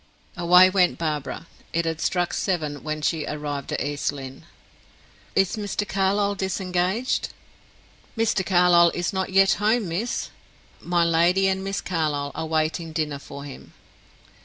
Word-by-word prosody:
Away 180 +1 +6
went 185 -1 +2
Barbara. 155 -1 -3 0.3
It 170 0 0
had 165 0 -2
struck 180 -2 0
seven 155 -7 -2
when 155 0 -4
she 160 -1 0
arrived 145 -2 -4
at - - -2
East 145 +1 -1
Lynne. 135 -2 -9 0.9
"Is 195 +2 +2
Mr. 205 0 -3
Carlyle 200 +1 +1
disengaged?" 190 +4 -1 0.9
"Mr. 225 -4 +1
Carlyle 175 -2 +5
is 175 +3 -2
not 190 -1 -1
yet 195 0 +5
home, 215 -2 +2
miss. 210 +9 -3 0.5
My 175 -1 +1
lady 170 +4 +3
and 190 0 0
Miss 195 0 -3
Carlyle 150 -5 -2
are 160 +1 -4
waiting 160 +1 -1
dinner 150 -3 -2
for 140 0 -10
him." 140 - -11
175 Hz, 140 wpm, -24 LUFS, 155-190 Hz, 0.9 s, Away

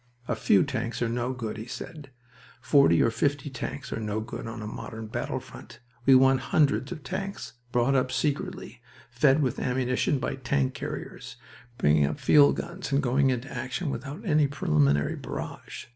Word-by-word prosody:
"A - - 0
few 100 - +4
tanks 120 -4 -3
are - - +1
no 120 +2 -1
good," 115 -4 -5
he 110 +2 -7
said. 150 +2 -8 0.5
"Forty 130 - +4
or 115 - +2
fifty 140 +4 -1
tanks 135 +2 -5
are - - -3
no 105 -1 -2
good 110 +1 -6
on 115 -1 -6
a - - -5
modern 110 +1 -7
battle 110 - -3
front. - - -13 0.3
We 135 - +8
want 135 0 +5
hundreds 140 -2 +1
of 160 -5 -7
tanks, 195 +8 -5 0.2
brought 120 +2 +2
up 130 -1 +1
secretly, 140 +2 -3 0.3
fed 135 +4 +3
with 130 0 -1
ammunition 125 +2 0
by 130 +1 -3
tank 135 0 0
carriers, - - -7 0.4
bringing 75 -1 +3
up 75 - -4
field 145 -1 +6
guns 175 -2 -6
and 140 - +3
going 135 +2 +3
into 130 +1 -3
action 130 +6 -3
without 140 +7 -6
any 150 -5 +3
preliminary 75 - +1
barrage. - - -7
130 Hz, 175 wpm, -27 LUFS, 115-140 Hz, 0.5 s, We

